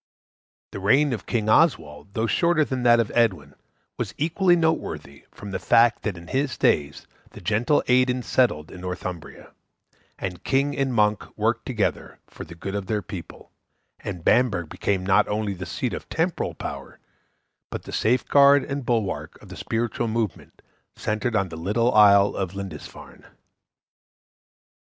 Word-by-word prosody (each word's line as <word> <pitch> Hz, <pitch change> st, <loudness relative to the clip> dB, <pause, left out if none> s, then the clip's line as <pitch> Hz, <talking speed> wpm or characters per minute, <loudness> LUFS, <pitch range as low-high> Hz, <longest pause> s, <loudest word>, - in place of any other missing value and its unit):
The -, -, -6 dB
reign 130 Hz, +8 st, +3 dB
of 110 Hz, -, -6 dB
King 110 Hz, -3 st, -1 dB
Oswald, 100 Hz, -, +1 dB
though 110 Hz, -, 0 dB
shorter 155 Hz, -, +2 dB
than 130 Hz, -2 st, -3 dB
that 120 Hz, -1 st, +5 dB
of 115 Hz, -, 0 dB
Edwin, 90 Hz, -, +1 dB, 0.5 s
was -, -, -4 dB
equally 175 Hz, +4 st, +2 dB
noteworthy 160 Hz, -, -2 dB
from 100 Hz, -, -10 dB
the 95 Hz, -, -3 dB
fact 115 Hz, 0 st, +4 dB
that 100 Hz, -5 st, -3 dB
in 85 Hz, 0 st, -12 dB
his 135 Hz, 0 st, -1 dB
days 70 Hz, -1 st, +1 dB, 0.3 s
the -, -, -10 dB
gentle 115 Hz, +7 st, +1 dB
Aidan 125 Hz, 0 st, +2 dB
settled 100 Hz, -15 st, +1 dB
in 90 Hz, -, -10 dB
Northumbria, 90 Hz, -2 st, -7 dB, 0.7 s
and 90 Hz, -1 st, -6 dB
king 140 Hz, +2 st, +1 dB
and 135 Hz, -1 st, 0 dB
monk 105 Hz, -3 st, +2 dB
worked -, -, 0 dB
together -, -, -2 dB
for -, -, -10 dB
the 85 Hz, -, -11 dB
good 95 Hz, +3 st, -6 dB
of 100 Hz, -2 st, -4 dB
their 105 Hz, -2 st, -1 dB
people, -, -, -10 dB, 0.5 s
and 90 Hz, -4 st, -7 dB
Bamburgh 100 Hz, -10 st, +2 dB
became 95 Hz, -2 st, -2 dB
not 95 Hz, 0 st, +3 dB
only 105 Hz, -1 st, -2 dB
the 90 Hz, -1 st, -7 dB
seat 85 Hz, -, -3 dB
of -, -, -7 dB
temporal -, -, -1 dB
power -, -, -7 dB, 0.7 s
but -, -, -6 dB
the -, -, -9 dB
safeguard 140 Hz, +4 st, +4 dB
and 140 Hz, 0 st, -4 dB
bulwark 115 Hz, -5 st, -2 dB
of -, -, -16 dB
the -, -, -9 dB
spiritual 115 Hz, +1 st, -2 dB
movement 110 Hz, -3 st, -4 dB, 0.3 s
centred 110 Hz, +3 st, -2 dB
on 100 Hz, -3 st, +1 dB
the 80 Hz, -, -8 dB
little 110 Hz, +8 st, 0 dB
isle 100 Hz, -1 st, +6 dB
of 95 Hz, -1 st, -3 dB
Lindisfarne. 100 Hz, -1 st, -9 dB
110 Hz, 155 wpm, -24 LUFS, 95-125 Hz, 0.7 s, isle